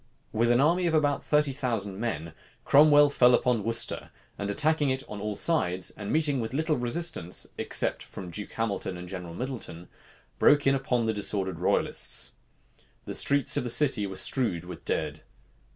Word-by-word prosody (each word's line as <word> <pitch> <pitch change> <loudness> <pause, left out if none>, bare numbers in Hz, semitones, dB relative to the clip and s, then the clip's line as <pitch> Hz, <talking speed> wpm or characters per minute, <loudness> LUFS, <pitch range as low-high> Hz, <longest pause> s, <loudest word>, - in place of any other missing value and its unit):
With 120 +2 +1
an 120 0 +4
army 170 +5 +2
of 160 - +1
about 145 -3 +1
thirty 150 -1 +2
thousand 115 -8 -2
men, 85 -9 -4 0.3
Cromwell 145 0 +6
fell 125 -3 +5
upon 120 -3 0
Worcester; 115 +1 -2 0.3
and 100 0 -4
attacking 150 +5 +2
it 130 0 -1
on 105 -1 -7
all 105 0 -3
sides, 95 - +1
and 100 -1 -7
meeting 150 -4 +1
with 115 +2 -4
little 155 +1 +1
resistance, 125 - -1
except - - 0
from 90 -2 -9
Duke 105 +3 -6
Hamilton 100 -5 -3
and 90 0 -9
General 90 -2 -7
Middleton, 115 -8 -7 0.5
broke 145 0 +4
in 135 - +4
upon 130 -3 0
the 110 0 0
disordered 100 -2 -2
royalists. - - +1 0.7
The - - -5
streets 140 -2 +2
of - - 0
the 120 - -3
city 120 -5 +3
were 95 - -7
strowed 105 - 0
with 90 -2 -10
dead. 75 -1 -3
120 Hz, 170 wpm, -27 LUFS, 100-145 Hz, 0.7 s, Cromwell